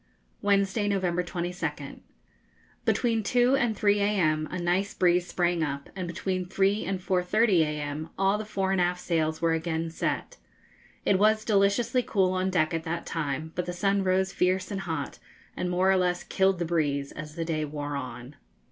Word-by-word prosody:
Wednesday, 200 +1 +2
November 180 -3 0
22nd. 175 0 -4 0.9
Between 230 -2 +2
2 245 +4 +3
and 240 -5 0
3 205 0 +3
a.m. 170 -7 +1
a 180 - -4
nice 180 +3 0
breeze 180 0 +3
sprang 175 -2 0
up, 140 -2 -3
and 185 -2 -4
between 185 +1 -3
3 195 +2 +1
and 190 +1 -2
4.30 185 +2 +2
a.m. 150 0 -3
all 195 +2 +2
the - - -3
fore 195 -3 -1
and 190 -2 +2
aft 180 0 +1
sails 160 -2 -1
were 165 -1 +3
again 165 0 -2
set. - - -3 0.7
It 190 -2 +3
was 215 +1 +3
deliciously 210 +4 +2
cool 190 -6 +1
on 185 0 0
deck 170 -3 +1
at 165 0 -2
that 170 +1 -3
time; 155 0 -3
but 180 - -3
the 180 - -3
sun 195 +2 +1
rose 190 0 +1
fierce 185 +1 +1
and 195 -1 -3
hot, 160 -6 -4 0.4
and 180 - -2
more 185 +2 +3
or 190 - +4
less 180 -1 0
killed 190 0 +2
the 170 - -2
breeze 145 -4 0
as 155 0 -8
the 165 -1 -3
day 155 -2 -1
wore 145 -1 -4
on. 130 0 -7
180 Hz, 180 wpm, -27 LUFS, 165-195 Hz, 0.9 s, or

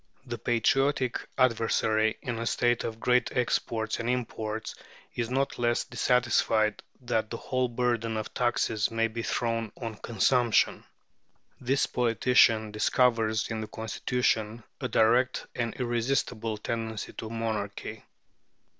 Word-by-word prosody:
The 120 -2 -5
patriotic 130 +3 +1 0.2
adversary 110 -3 +2
in 120 -2 -3
a 115 - -2
state 120 0 +1
of 110 0 -5
great 125 +1 +2
exports 115 -2 0
and 115 +1 -2
imports 110 -3 -3 0.4
is 115 -1 -2
not 135 +1 -1
less 120 0 +1
dissatisfied 120 -3 +1 0.2
that 115 -3 -1
the 115 - -4
whole 130 +1 -1
burden 120 -2 -1
of 110 - -5
taxes 120 -3 +1
may 115 0 +1
be 115 +1 -5
thrown 115 -2 -1
on 115 -1 -5
consumption. 115 +1 +2 0.7
This 135 +3 +1
politician 115 -2 +3
discovers 110 0 +2
in 110 -1 -2
the 110 - -5
constitution 110 0 -1 0.2
a - - -2
direct 120 +3 +2
and 115 -1 -2
irresistible 120 -2 -1
tendency 110 0 -4
to 110 - -6
monarchy. 110 -1 -4
115 Hz, 125 wpm, -28 LUFS, 110-125 Hz, 0.7 s, politician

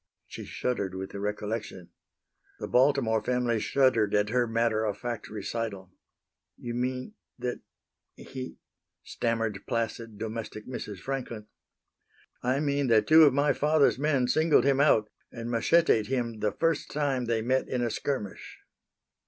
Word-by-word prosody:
She - - -9
shuddered 100 -7 -2
with 95 0 -5
the 100 - -6
recollection. 105 -2 -4 0.7
The - - -4
Baltimore 125 -4 +3
family 120 0 0
shuddered 120 -4 +2
at 105 0 +2
her 125 +1 +1
matter 115 -1 +1
of 105 -2 -1
fact 120 -2 -5
recital. 105 -2 -5 0.7
"You 120 - -6
mean 125 - -3 0.2
that 125 0 -3 0.6
he" 130 -1 -8 0.5
stammered 115 -3 -2
placid, 115 -2 -3
domestic 110 0 -6
Mrs. 105 -5 -6
Franklin. 125 -5 -4 1.0
"I 130 +2 +1
mean 140 -2 0
that 110 -3 +4
two 160 0 +8
of 140 - +4
my 145 +1 +3
father's 150 -2 +3
men 140 -4 +2
singled 155 -1 +4
him 140 -1 +3
out 125 -7 +4 0.2
and 115 0 -6
macheted 115 -2 +3
him 120 -4 -2
the 105 - 0
first 165 -2 0
time 140 -4 -1
they 115 -1 0
met 130 +3 +1
in 125 -1 -1
a 120 - 0
skirmish." 120 -8 -4
120 Hz, 145 wpm, -28 LUFS, 110-135 Hz, 1.0 s, two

